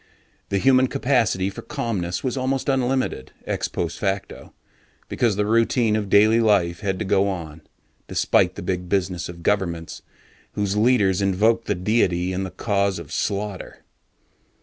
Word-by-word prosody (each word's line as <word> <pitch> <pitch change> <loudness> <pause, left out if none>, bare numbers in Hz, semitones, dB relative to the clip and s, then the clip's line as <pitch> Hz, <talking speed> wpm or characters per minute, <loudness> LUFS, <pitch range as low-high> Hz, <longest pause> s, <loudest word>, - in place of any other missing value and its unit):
The 100 - 0
human 130 +4 +4
capacity 120 -8 +1
for - - -8
calmness 105 - -3
was 130 - -1
almost 135 +1 -1
unlimited, 130 - -1
ex - - -2
post 85 - -4
facto, 95 -1 -3 0.6
because 115 -4 +1
the 105 +1 0
routine 115 0 +2
of 105 -2 -2
daily 110 +3 +5
living 100 -6 +3
had 95 -3 -1
to 110 - -3
go 100 +1 +2
on, 80 -4 -6 0.5
despite - - +2
the - - -7
big 90 -1 -3
business 90 -3 -1
of 85 -1 -10
governments 85 -5 -1 0.5
whose 100 -1 -1
leaders 105 -4 +3
invoked 105 +4 +2
the 105 - -1
Deity 90 -2 +1
in 95 - -2
the 95 - -3
cause 100 +1 -1
of 85 -3 -9
slaughter. 100 +2 -4
100 Hz, 150 wpm, -23 LUFS, 90-115 Hz, 0.6 s, daily